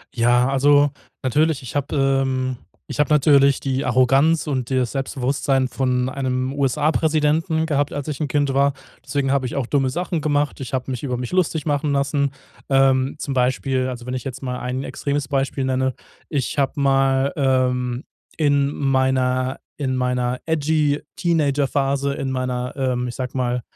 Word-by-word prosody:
Ja, 120 +1 +3
also 145 +1 +4 0.3
natürlich, 150 +3 +1
ich 125 - -8
habe 145 +1 -1 0.3
ähm 130 -1 -1 0.3
ich - - -6
habe 150 - +2
natürlich 140 -2 +5
die 135 0 -2
Arroganz 135 +6 +3
und 130 -3 -2
das 130 -3 0
Selbstbewusstsein 135 0 0
von 125 -1 0
einem 130 -1 -2
USA-Präsidenten 155 +3 +1
gehabt, 145 -2 0
als 145 0 -4
ich 150 -3 -4
'n 150 - -1
Kind 145 +1 +1
war. 140 0 +3 0.3
Deswegen 140 -2 -1
habe 135 -1 +1
ich 125 - -4
auch 135 -4 -1
dumme 135 -2 +1
Sachen 175 +1 -2
gemacht. 145 -1 0
Ich 130 -2 -7
habe 130 0 -2
mich 130 0 -4
über 125 -3 -2
mich 125 0 -5
lustig 165 -4 0
machen 145 0 0
lassen. 140 0 +1 0.4
Ähm. 135 -1 +3
Zum 140 -3 -3
Beispiel, 130 +1 +1
also, 120 -1 -7
wenn 125 - -3
ich 130 - -4
jetzt 135 -1 -6
mal 125 -2 -3
ein 125 +2 -3
extremes 140 0 -3
Beispiel 135 -1 -1
nenne, 130 0 0 0.4
ich 140 -4 -2
habe 140 -1 +2
mal, 135 0 +2
ähm, 130 -2 0 0.3
in 145 -2 +2
meiner 130 -1 +1 0.2
in 130 -3 -1
meiner 125 0 -1
edgy 155 -2 +1 0.2
Teenager-Phase 140 -3 +1
in 135 -1 -3
meiner, 125 0 -3
ähm, 125 -2 -1
ich 120 - -5
sage 130 0 -4
mal, 125 -1 0
135 Hz, 165 wpm, -21 LUFS, 130-145 Hz, 0.4 s, natürlich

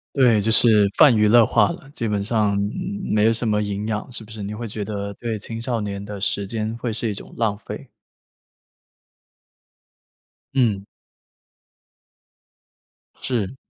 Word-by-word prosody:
对， 120 -6 +4
就 110 +2 +1
是 110 -3 +5
泛 145 -6 +7
娱 105 -1 +4
乐 115 +1 +6
化 105 -3 +3
了， 135 - -7
基 115 -5 -3
本 100 -1 -1
上， 105 -2 +1
嗯， 185 - -3
没 105 0 +3
有 115 - +5
什 115 0 -2
么 105 0 +2
营 105 0 -3
养， 110 +3 -3
是 115 - -5
不 110 - -15
是？ 110 - -7
你 100 +1 -5
会 115 +1 -5
觉 105 0 -4
得 100 -1 -4
对 115 +1 -4
青 115 +2 -6
少 120 -1 -1
年 100 -1 -4
的 100 -1 -7
时 100 0 -1
间， 110 +1 -3
会 120 0 -3
是 110 0 -2
一 - - -3
种 100 - -9
浪 110 -3 +1
费。 - - -8 2.7
嗯。 110 -7 +1 2.4
是。 120 -2 -2
110 Hz, 175 characters per minute, -22 LUFS, 105-115 Hz, 2.7 s, 泛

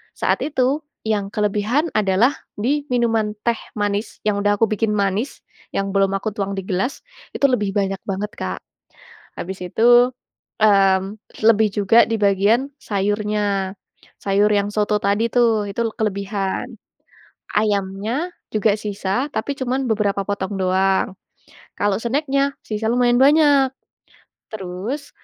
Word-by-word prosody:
saat - - +1
itu, 275 -1 +1 0.3
yang 210 -3 0
kelebihan 210 +9 0
adalah 210 +6 +3 0.2
di 280 +7 0
minuman 225 -3 +1
teh 235 -1 +2 0.2
manis 205 +1 -2
yang 205 -1 +1
udah 205 0 +2
aku 225 - +4
bikin 220 +1 0
manis, 200 +4 -1 0.3
yang 195 0 0
belum 195 -1 +2
aku 205 +3 -3
tuang 200 -1 -3
di - - -1
gelas, 195 +9 -2 0.3
itu - - +2
lebih 210 -5 0
banyak 195 -1 0
banget 200 +2 -2
Kak. 90 0 -4 0.8
Habis 185 0 -5
itu, 240 +5 +5 0.5
mmm, 195 -2 +5 0.4
lebih 220 -1 +5
juga 210 +3 +5
di 225 - +1
bagian 205 +6 +2
sayurnya. 205 -1 -1 0.5
Sayur 200 +1 +3
yang 200 -1 +2
soto 210 0 +1
tadi 205 +3 +1
tuh, 225 -4 +2
itu 215 - -3
kelebihan. 200 -2 -2 0.8
Ayamnya 210 - 0 0.2
juga 215 -1 +3
sisa, 205 +4 -2
tapi 280 +6 -2
cuman 260 +1 -1
beberapa 205 -2 +1
potong 200 0 -3
doang. 190 0 +1 0.6
Kalau 205 -1 +1
snack-nya, 275 +3 0
sisa 215 0 -3
lumayan 245 0 +3
banyak. 285 -1 +5 0.8
Terus 215 +8 -5
210 Hz, 130 wpm, -21 LUFS, 195-235 Hz, 0.8 s, itu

